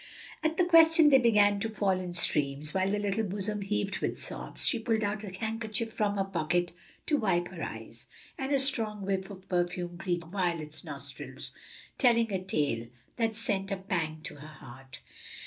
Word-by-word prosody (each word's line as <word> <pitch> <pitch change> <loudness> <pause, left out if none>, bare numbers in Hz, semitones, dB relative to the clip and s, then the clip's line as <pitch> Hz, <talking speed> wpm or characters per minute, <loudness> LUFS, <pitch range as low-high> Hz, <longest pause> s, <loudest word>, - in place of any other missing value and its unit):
At 315 +1 0
the 360 - +4
question 325 -2 +7
they 270 -2 +7
began 205 -4 +4
to 225 - -1
fall 200 -3 +1
in 180 -1 -5
streams, 145 -2 +1
while 190 0 +1
the 205 - +1
little 205 +1 0
bosom 205 +1 -2
heaved 200 0 -1
with - - -2
sobs. - - -3
She 240 - +3
pulled 220 -1 0
out 205 +1 -2
a 205 - -5
handkerchief 220 +3 -2
from 205 -1 0
her 195 - +2
pocket 175 -2 0 0.3
to 300 - +2
wipe 180 -7 +1
her 175 -3 -9
eyes, - - -7 0.3
and 270 +1 -3
a 280 - +4
strong 225 -7 0
whiff 190 0 -1
of 190 -2 -11
perfume 175 -1 -1
greeted 175 -3 -3
Violet's 170 -6 -2
nostrils, 140 -4 -7 0.5
telling 235 -4 +4
a 185 -1 -1
tale 140 -10 -1 0.3
that 225 -2 0
sent 200 -3 0
a 195 - 0
pang 165 -5 -2
to - - -5
her 150 +2 -10
heart. 135 -3 -12
195 Hz, 180 wpm, -30 LUFS, 175-220 Hz, 0.5 s, question